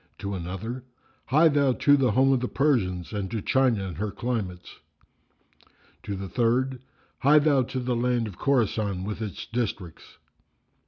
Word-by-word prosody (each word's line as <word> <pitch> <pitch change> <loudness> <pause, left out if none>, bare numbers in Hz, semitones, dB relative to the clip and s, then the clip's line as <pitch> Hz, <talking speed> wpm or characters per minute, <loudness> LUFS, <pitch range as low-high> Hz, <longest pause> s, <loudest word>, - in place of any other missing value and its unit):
To 100 0 -5
another, 95 +8 -5 0.4
"Hie 155 +5 +5
thou 140 -3 +2
to 145 +3 +4
the 130 -6 +2
home 135 +4 +4
of 130 - +2
the 125 - -2
Persians 95 - 0
and 100 -2 -3
to 115 - -3
China 125 -2 +2
and 90 -3 -7
her 105 0 -1
climates." 100 -7 -4 1.2
To 100 - -5
the 95 0 -5
third, 125 +4 0 0.4
"Hie 145 +3 +5
thou 145 -3 +4
to 130 +1 -3
the 125 -1 -1
land 120 0 +1
of 100 -5 -9
Khorasan 110 -7 0
with 105 +2 -5
its 105 -3 -5
districts." 105 -8 -5
120 Hz, 160 wpm, -26 LUFS, 100-130 Hz, 1.2 s, Hie